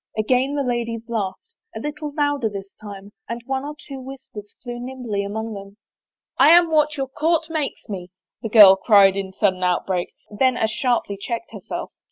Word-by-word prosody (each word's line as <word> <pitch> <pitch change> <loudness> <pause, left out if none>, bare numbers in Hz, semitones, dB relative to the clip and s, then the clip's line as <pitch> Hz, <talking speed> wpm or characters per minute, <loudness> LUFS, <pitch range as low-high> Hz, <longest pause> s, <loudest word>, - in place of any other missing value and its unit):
Again 255 +6 +1
the 285 - 0
ladies 235 -2 -2
laughed, 225 - -4 0.2
a - - -4
little 295 0 -5
louder 290 -5 +1
this 195 -1 -8
time, 200 -1 -10 0.2
and 235 +1 -3
one 265 +1 -2
or 295 +1 -6
two 275 -2 -7
whispers 255 -6 -10
flew 240 -1 -6
nimbly 245 -5 -4
among 220 +2 -4
them. 200 0 -10 0.3
" - - -71
I 280 - +7
am 345 -2 +3
what 300 -1 +2
your 270 -1 -2
court 320 +4 0
makes 305 -4 -3
me," 185 -4 -6 0.3
the 225 - -4
girl 205 -3 +9
cried 195 -2 +5
in 195 -1 -4
sudden 190 -1 0
outbreak, 180 0 -1 0.2
then 255 +2 +2
as 220 0 0
sharply 235 -5 -1
checked 235 - -4
herself. - - -6
235 Hz, 185 wpm, -22 LUFS, 200-275 Hz, 0.3 s, girl